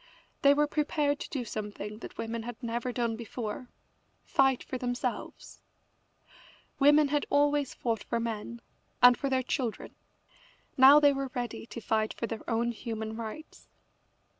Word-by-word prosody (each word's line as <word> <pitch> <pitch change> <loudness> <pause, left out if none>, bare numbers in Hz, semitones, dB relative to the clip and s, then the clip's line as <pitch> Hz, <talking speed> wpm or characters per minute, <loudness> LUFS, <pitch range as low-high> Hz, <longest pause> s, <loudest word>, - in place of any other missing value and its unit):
They 280 0 +6
were 295 +1 +3
prepared 295 -1 0
to - - -6
do 260 -4 -3
something 210 -1 -6
that - - -10
women 230 0 -3
had 240 +2 -8
never 235 +2 -2
done 235 -2 -1
before 230 +1 -6 0.5
fight 270 -2 +2
for 255 - -5
themselves. 245 0 -4 1.2
Women 295 +1 +5
had 295 0 0
always 290 -1 +2
fought 230 -3 -2
for 235 - -1
men, 230 0 -4 0.4
and 245 0 +9
for 275 - -2
their 260 -1 +1
children. 245 -3 -3 0.8
Now 270 +3 +9
they 290 -1 +5
were 275 -1 -3
ready 240 -2 -4
to 235 - -8
fight 220 0 0
for - - -3
their 225 -1 -6
own 235 +1 +1
human 220 -1 -5
rights. 230 +7 -8
245 Hz, 150 wpm, -29 LUFS, 225-275 Hz, 1.2 s, and